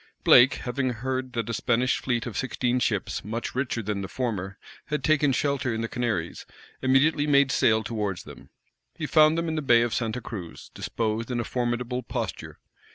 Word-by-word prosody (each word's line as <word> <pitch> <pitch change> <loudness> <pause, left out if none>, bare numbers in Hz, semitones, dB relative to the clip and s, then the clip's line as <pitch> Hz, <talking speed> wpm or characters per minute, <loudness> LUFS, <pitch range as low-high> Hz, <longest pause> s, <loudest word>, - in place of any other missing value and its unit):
Blake, 125 +3 +7
having 130 +1 -2
heard 130 +2 -3
that 115 -3 -2
a 115 - -3
Spanish 120 +3 +1
fleet 120 -2 -1
of 120 - -6
sixteen 125 -1 0
ships, - - -1
much 115 +3 -4
richer 125 -3 -2
than 105 -1 -2
the 95 - -4
former, 100 -5 -3 0.3
had 150 -3 -2
taken 150 -2 +3
shelter 135 -1 0
in 115 0 -2
the 115 - -2
Canaries, 110 -9 -2 0.4
immediately 145 +3 +3
made 140 -2 +4
sail 110 -2 +3
towards 105 -5 -3
them. - - -13 0.5
He 155 - -4
found 155 +1 +5
them 165 0 -1
in 160 - -1
the 155 - -1
Bay 120 -4 +5
of 120 - -2
Santa 115 +1 -1
Cruz, 100 -8 -8
disposed 115 +1 -2
in 125 -1 -1
a - - 0
formidable 120 +1 -2
posture. 115 -8 -5
120 Hz, 185 wpm, -26 LUFS, 115-135 Hz, 0.5 s, Blake